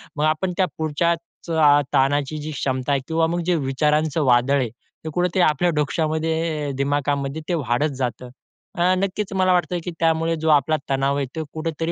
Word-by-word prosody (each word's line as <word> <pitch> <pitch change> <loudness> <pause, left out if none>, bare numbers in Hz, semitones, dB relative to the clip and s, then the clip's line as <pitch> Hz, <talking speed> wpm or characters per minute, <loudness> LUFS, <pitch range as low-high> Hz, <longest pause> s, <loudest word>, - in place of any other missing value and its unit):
मग 150 - -1
आपण 155 +4 0
त्या 190 - +3
पुढच्याच 165 +2 -2
अ, 145 -3 +5
ताणाची 145 +2 +1
जी 150 +1 -5
क्षमता 130 -1 -2
आहे 140 - +1
किंवा 165 0 +1
मग 175 +1 -1
जे 180 0 +2
विचारांचं 150 +2 +1
वादळ 125 +2 +4
आहे, 125 -3 -1
ते 120 +7 -12
कुठे 180 +2 +2
ते 185 - +3
आपल्या 165 +2 +3
डोक्यामध्ये 155 0 -1
दिमागामध्ये 140 +1 -1
ते - - +1
वाढत 135 +1 0
जातं. 125 -1 -3 0.5
अ, 180 0 +3
नक्कीच 195 +1 -2
मला 185 -1 +3
वाटतं 180 0 0
की 180 - -4
त्यामुळे 165 0 +1
जो 160 - +1
आपला 150 +1 +4
तणाव 135 +1 +1
आहे 140 - 0
तो 160 - -2
कुठेतरी 165 +1 -3
155 Hz, 180 wpm, -22 LUFS, 140-165 Hz, 0.5 s, अ